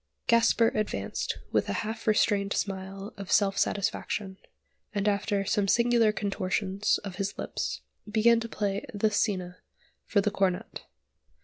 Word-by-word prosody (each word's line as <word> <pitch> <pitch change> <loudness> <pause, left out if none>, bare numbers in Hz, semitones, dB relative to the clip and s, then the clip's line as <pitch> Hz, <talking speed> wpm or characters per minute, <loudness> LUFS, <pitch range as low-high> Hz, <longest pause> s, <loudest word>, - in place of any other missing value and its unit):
Gasper 230 -1 +4
advanced 215 -1 -2
with - - +1
a - - 0
half 220 +1 -5
restrained 205 -2 +2
smile 195 +2 -4
of 195 -1 -7
self 200 -2 +4
satisfaction, 200 -1 -1 0.6
and 200 0 0
after 200 0 +1
some 200 0 +1
singular 235 0 +4
contortions 195 0 0
of 195 -3 -7
his 200 0 -3
lips - - -3 0.3
began 225 +2 +4
to 230 0 -5
play 200 -2 -2
the 215 +1 +2
scena 185 -4 -1 0.5
for 205 - +2
the 200 +1 +1
cornet. 190 -3 -1
205 Hz, 135 wpm, -28 LUFS, 195-215 Hz, 0.6 s, Gasper